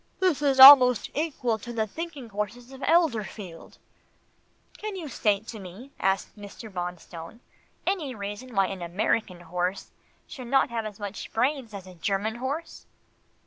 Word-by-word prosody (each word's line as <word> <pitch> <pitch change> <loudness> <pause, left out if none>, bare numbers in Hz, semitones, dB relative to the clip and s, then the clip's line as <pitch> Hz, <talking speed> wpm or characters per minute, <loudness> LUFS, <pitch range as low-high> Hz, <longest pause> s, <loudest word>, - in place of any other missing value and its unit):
"This 360 -6 +1
is 275 -2 +2
almost 255 -4 +10
equal 270 -7 -1
to 240 +3 -8
the 225 -2 -1
thinking 290 0 -7
horses 220 +5 -5
of 265 0 -12
Elberfeld." 220 - -1 1.0
"Can 425 -1 -5
you 345 -5 -6
state 210 -5 0
to 220 - -7
me," 195 +9 -11
asked 195 +1 0
Mr. 205 +1 -11
Bonstone, 175 +1 -7 0.5
"any 320 -10 -1
reason 205 +4 -7
why 195 0 +4
an 190 -1 -6
American 180 +1 -1
horse 180 +3 -3 0.3
should 255 -4 -9
not 270 -1 +2
have 225 -2 -2
as 210 -1 -10
much 205 -1 -6
brains 255 0 0
as 200 -3 -8
a 185 - -12
German 200 +6 -2
horse?" 280 +7 -5
220 Hz, 150 wpm, -26 LUFS, 195-270 Hz, 1.0 s, almost